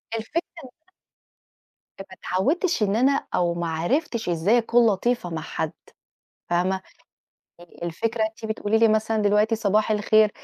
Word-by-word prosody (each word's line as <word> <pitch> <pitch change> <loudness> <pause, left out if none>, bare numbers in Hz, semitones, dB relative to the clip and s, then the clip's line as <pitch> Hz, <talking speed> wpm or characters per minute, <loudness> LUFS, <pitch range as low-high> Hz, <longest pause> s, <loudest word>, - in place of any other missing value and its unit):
الفكرة 225 +10 -2 0.2
إن 260 - -11
أنا - - -64 1.1
فما 195 - -8
اتعودتش 270 - 0
إن 200 +1 +1
أنا 270 +4 +2
أو 175 -1 +1
ما 170 0 -3
عرفتش 220 - -1
إزاي 175 +7 +2
أكون 235 0 +3
لطيفة 215 0 -1
مع 165 -1 -4
حد، 160 0 -4 0.8
فاهمة؟ 185 +2 0 0.8
يعني 175 -1 -17
الفكرة 220 +7 -1
أنتِ 220 +1 -6
بتقولي 220 0 0
لي 225 0 +5
مثلًا 220 0 +1
دلوقتي 210 +2 +2
صباح 215 0 +1
الخير، 215 0 +3
215 Hz, 145 wpm, -24 LUFS, 185-230 Hz, 1.1 s, لي